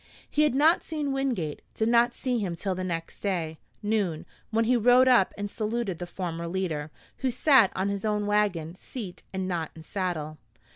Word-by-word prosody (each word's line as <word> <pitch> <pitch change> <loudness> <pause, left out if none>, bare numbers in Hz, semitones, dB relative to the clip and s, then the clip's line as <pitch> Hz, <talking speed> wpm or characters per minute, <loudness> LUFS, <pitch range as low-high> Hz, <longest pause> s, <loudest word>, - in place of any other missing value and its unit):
He 300 - +1
had 300 -4 +3
not 310 +5 +4
seen 300 -3 -2
Wingate 250 - -1
did 220 - +1
not 235 +1 +4
see 250 -3 -1
him 185 -5 -2
till 190 +3 -2
the 185 0 -4
next 165 -2 -4
day, 170 -6 -2 0.2
noon, 205 -7 0 0.2
when 225 +1 +2
he 250 +2 +3
rode 245 +2 +6
up 240 -7 +5
and 205 0 -2
saluted 215 -3 -2
the 175 - -5
former 170 -2 -4
leader, 165 -5 -2 0.3
who 265 - 0
sat 255 -3 +5
on 190 +1 0
his 200 -1 -3
own 210 -1 0
wagon 200 -6 +1
seat 190 0 -8
and 190 -1 -2
not 170 -4 -2
in 160 - -11
saddle. 160 -5 -3
200 Hz, 190 wpm, -27 LUFS, 175-240 Hz, 0.3 s, rode